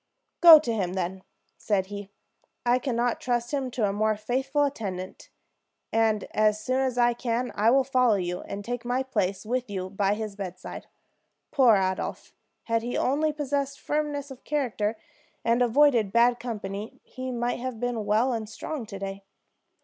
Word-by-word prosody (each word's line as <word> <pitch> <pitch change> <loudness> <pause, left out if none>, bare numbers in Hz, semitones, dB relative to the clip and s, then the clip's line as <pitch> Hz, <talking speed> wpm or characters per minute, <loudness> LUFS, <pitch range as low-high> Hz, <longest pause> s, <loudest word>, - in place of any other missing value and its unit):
"Go 335 -2 +12
to 270 -6 -1
him, 185 -5 -1
then," 185 0 -3 0.4
said 200 -3 0
he. 200 0 -8 0.6
"I 245 +1 +3
can 255 -2 -2
not 240 0 0
trust 240 -1 -1
him 270 -2 -1
to 235 -4 0
a 195 - -1
more 215 +1 +1
faithful 265 +6 0
attendant; 195 -9 -4 0.6
and 220 -2 +2
as 215 0 +2
soon 255 +4 -1
as 260 -2 0
I 240 0 +4
can 240 +1 -2
I 215 +3 +3
will 270 +2 +4
follow 255 -4 +3
you, 180 -2 -2
and 200 0 -7
take 245 0 -3
my 250 +2 0
place 205 -6 -1
with 245 +1 -2
you 185 -2 -4
by 200 0 +1
his 215 -2 -5
bedside. 185 -3 -7 0.6
Poor 255 -7 +5
Adolphe! 190 -1 -2 0.3
Had 230 0 0
he 240 +2 -3
only 300 +4 +1
possessed 280 -2 -2
firmness 295 -2 -2
of 265 - -11
character, 230 -7 -1 0.5
and 235 +2 +3
avoided 245 -4 +4
bad 240 +2 +4
company, 210 -3 -6
he 255 0 -7
might 240 0 -1
have 250 -2 -5
been 245 -2 -2
well 220 +5 +2
and 220 -2 -4
strong 245 +2 -6
to 200 -3 -7
day. 195 0 -6
235 Hz, 170 wpm, -26 LUFS, 205-255 Hz, 0.6 s, Go